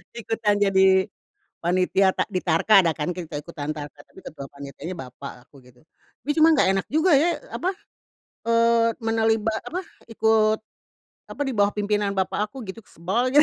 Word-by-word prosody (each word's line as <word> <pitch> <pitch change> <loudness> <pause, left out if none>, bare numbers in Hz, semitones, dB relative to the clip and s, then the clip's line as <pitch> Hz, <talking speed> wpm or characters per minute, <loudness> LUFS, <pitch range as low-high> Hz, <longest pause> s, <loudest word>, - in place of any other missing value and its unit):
Ikutan 220 -3 -1
jadi 190 -1 +4 0.6
panitia 185 +2 +2
tak - - -1
di 185 - -1
tarka 175 +5 +4
ada 165 - +2
kan 150 +3 -3
kita 165 -4 -6
ikutan 155 -2 -6
tarka 145 -1 -7
tapi - - -20
ketua 140 -3 -9
panitianya 140 +5 -8
bapak 125 -1 -10
aku 140 -3 -19
gitu, 125 +1 -21 0.4
tapi 295 - -4
cuma 320 +1 +5
nggak 280 - +3
enak 195 - -1
juga 315 +5 +2
ya 330 +5 +3 0.2
apa, 370 - -1 0.7
eee, 230 0 +3
menaliba 225 -1 +1
apa, 365 +3 -4 0.2
eee, 230 - -13
ikut 220 -1 +3 0.7
apa - - -4
di 265 - -2
bawah 205 -1 +3
pimpinan 205 -1 0
bapak 210 +2 -1
aku 265 -2 -9
gitu, 210 +4 -8
sebal 225 +10 -1
aja. 295 +2 +6
205 Hz, 170 wpm, -24 LUFS, 165-225 Hz, 0.7 s, aja